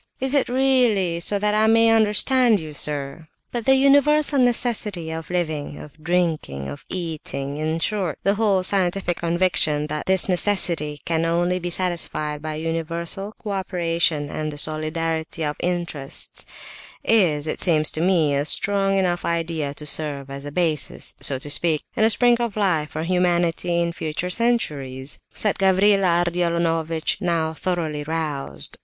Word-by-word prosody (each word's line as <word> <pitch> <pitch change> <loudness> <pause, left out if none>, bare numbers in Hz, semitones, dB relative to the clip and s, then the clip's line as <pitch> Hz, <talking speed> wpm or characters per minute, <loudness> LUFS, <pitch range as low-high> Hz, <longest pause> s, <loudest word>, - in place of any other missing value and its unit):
Is 265 +1 -1
it 280 -4 +2
really 245 -9 +2
so 200 +4 +2
that 210 +1 0
I 215 +1 +3
may 225 0 +5
understand 225 +1 +3
you, 155 -2 -8
sir?" 145 +1 -2 0.2
"But 240 -2 -4
the 265 0 +5
universal 285 +2 +4
necessity 225 -8 0
of 160 -1 -6
living, 155 -5 -2
of 150 +1 -13
drinking, 160 - -1
of 70 - -9
eating—in 155 -3 -3
short, 185 -2 -1
the 200 - +3
whole 205 -3 +1
scientific 185 -2 0
conviction 170 -3 +1
that 150 - -4
this 190 -1 +4
necessity 175 -6 +1
can 165 -1 0
only 175 +2 0
be 175 0 -4
satisfied 160 -4 -2
by 155 0 -4
universal 165 +5 -3
co 210 - -4
operation 170 -5 0
and 155 0 -3
the 145 - -9
solidarity 160 +1 -1
of 150 0 -2
interests—is, 170 +1 -2
it 155 - -2
seems 155 -4 +2
to 155 - -4
me, 170 -5 +2
a 140 0 +1
strong 195 +4 +2
enough 175 -2 0
idea 165 -4 -2
to 150 - -6
serve 145 -2 -2
as 140 +1 -7
a 145 - -6
basis, 160 -3 -1
so 135 - +4
to 145 +3 -3
speak, 160 -1 +2
and 220 - +3
a - - +3
'spring 240 +2 +4
of 235 -4 -2
life,' 170 -7 +1
for 155 - -4
humanity 175 -1 +1
in 170 0 -1
future 160 +3 -4
centuries," 145 - -2
said 210 - 0
Gavrila 190 -2 +3
Ardalionovitch, 170 -1 -1
now 165 -3 0
thoroughly 160 -3 -2
roused. 145 - -3
170 Hz, 150 wpm, -22 LUFS, 155-195 Hz, 0.2 s, may